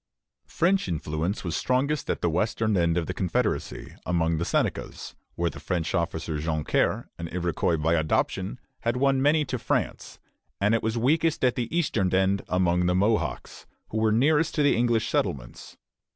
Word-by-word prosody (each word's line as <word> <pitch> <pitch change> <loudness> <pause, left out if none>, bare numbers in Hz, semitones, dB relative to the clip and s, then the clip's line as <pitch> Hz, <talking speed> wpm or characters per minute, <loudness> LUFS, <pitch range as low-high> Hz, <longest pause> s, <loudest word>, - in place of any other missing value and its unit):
French 185 - +1
influence 80 +3 -2
was 85 -3 -2
strongest 140 - 0
at - - -1
the 85 - +3
western 110 +4 0
end 85 -1 +2
of 85 - 0
the - - -4
confederacy, 90 -3 -2
among 85 -2 0
the - - 0
Senecas, - - -2 0.2
where 85 0 0
the - - -10
French 85 -4 -2
officer 80 -3 -2
Joncaire, 80 -1 0
an 85 - -4
Iroquois 85 -1 0
by 80 +2 +1
adoption, 90 +6 0 0.2
had 115 +1 -1
won 135 0 +2
many 150 +2 +3
to 130 -2 -3
France; - - -2 0.4
and 105 +2 +2
it 115 - +2
was 110 +1 -1
weakest 155 +5 +2
at 125 - +3
the 120 -2 -3
eastern 110 - +1
end, 95 +1 +2
among 90 -1 +2
the 90 - +2
Mohawks, 105 +4 -1 0.2
who 110 - -2
were 110 0 +3
nearest 150 +8 +2
to 150 - +2
the 145 - +4
English 115 -1 +1
settlements. - - -3
95 Hz, 170 wpm, -26 LUFS, 85-125 Hz, 0.4 s, the